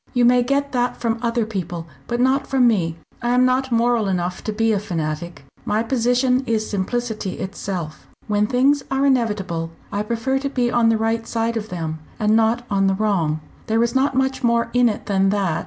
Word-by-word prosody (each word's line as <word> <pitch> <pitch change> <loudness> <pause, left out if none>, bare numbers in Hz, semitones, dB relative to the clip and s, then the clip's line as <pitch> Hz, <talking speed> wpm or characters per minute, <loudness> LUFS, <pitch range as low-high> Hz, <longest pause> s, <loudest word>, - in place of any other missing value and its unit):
"You 245 -1 +4
may 245 +1 +5
get 280 +3 0
that 245 -1 0
from 230 -1 -1
other 235 -1 0
people, 175 -6 -4 0.2
but 240 0 -2
not 265 +2 +2
from 265 -2 +3
me. 175 -8 +1 0.3
I 240 +1 +1
am 250 0 +5
not 260 +1 +1
moral 235 -2 +2
enough 180 -1 -2
to 215 - -1
be 225 +1 +1
a 205 - +1
fanatic. 165 -5 -4 0.2
My 215 +2 0
position 250 +2 +2
is 220 -2 0
simplicity 215 0 -2
itself. 180 -5 -5 0.2
When 210 0 +1
things 270 +4 +3
are 270 +1 +1
inevitable, 210 -11 0 0.2
I 205 - -1
prefer 235 +5 -1
to 275 0 -2
be 245 -3 0
on 235 -2 +3
the 225 - +3
right 225 +1 -1
side 230 0 -1
of 220 -1 -4
them, 160 -3 -4 0.2
and 215 0 +3
not 225 +2 +2
on 195 -1 +2
the 195 - +2
wrong. 180 -7 0 0.3
There 225 +1 +2
is 235 - 0
not 265 0 +1
much 265 0 0
more 235 0 +2
in 245 -1 +4
it 210 - -5
than 195 -1 +2
that. 195 -5 0
225 Hz, 205 wpm, -21 LUFS, 195-245 Hz, 0.3 s, may